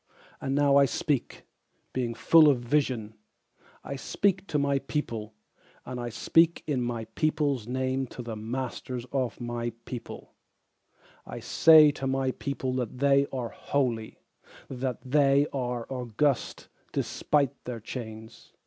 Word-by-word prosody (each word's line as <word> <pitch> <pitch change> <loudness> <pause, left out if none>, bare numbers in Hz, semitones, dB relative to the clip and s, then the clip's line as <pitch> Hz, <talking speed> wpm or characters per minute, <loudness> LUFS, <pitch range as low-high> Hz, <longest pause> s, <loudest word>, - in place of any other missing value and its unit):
And 135 0 -1
now 140 -1 +4
I 140 - +7
speak, 135 0 -2 0.5
being 120 -2 -2
full 160 +6 +6
of 140 - +3
vision: 120 -4 0 0.7
I 140 - -5
speak 195 +6 0
to 150 - 0
my 140 -1 +1
people, 115 -6 -4 0.5
and 125 -1 -5
I 120 0 -3
speak 165 +8 +3
in 140 -5 0
my 120 -2 -3
peopleŌĆÖs 145 -7 0
name 130 +1 -1
to 125 - -8
The 115 -1 -5
masters 125 +2 -4
of 130 -3 -1
my 120 -1 -3
people: 125 -2 -8 0.9
I - - -8
say 155 -2 +7
to 135 -2 -4
my 135 0 0
people 130 -1 -3
that 125 -1 -3
they 140 +1 +4
are 125 -3 -3
holy, 120 -6 -2 0.5
That 130 -1 -2
they 140 +1 +4
are 125 -3 -2
august 125 +1 -1 0.2
despite 140 -2 0
their 125 -2 -5
chains. 110 -1 -9
130 Hz, 135 wpm, -28 LUFS, 120-140 Hz, 0.9 s, I